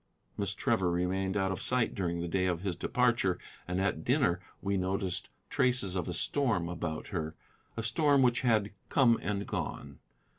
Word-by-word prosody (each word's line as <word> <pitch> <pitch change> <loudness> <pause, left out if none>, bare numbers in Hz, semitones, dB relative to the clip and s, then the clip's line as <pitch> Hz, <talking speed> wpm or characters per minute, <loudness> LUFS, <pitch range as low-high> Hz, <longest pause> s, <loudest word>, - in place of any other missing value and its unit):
Miss 100 -1 -2
Trevor 110 -8 +1
remained 95 +3 0
out 95 -1 +1
of 95 - -3
sight 125 -2 +1
during 85 -3 -2
the 85 - -2
day 95 +2 +1
of 90 -2 -1
his 95 -3 -2
departure, 120 -2 +2 0.3
and 90 +1 -1
at 95 -5 0
dinner 125 - +2 0.2
we 100 +1 -1
noticed 95 0 -1 0.2
traces 125 -7 +1
of 90 -3 -1
a 90 - -2
storm 110 -7 +1
about 85 -2 -4
her, 80 -5 -3 0.4
a 115 - -2
storm 140 +4 +4
which 120 -1 +3
had 110 -5 +2 0.2
come 120 -4 +4
and 100 +3 -2
gone. - - -4
95 Hz, 175 wpm, -31 LUFS, 90-115 Hz, 0.4 s, storm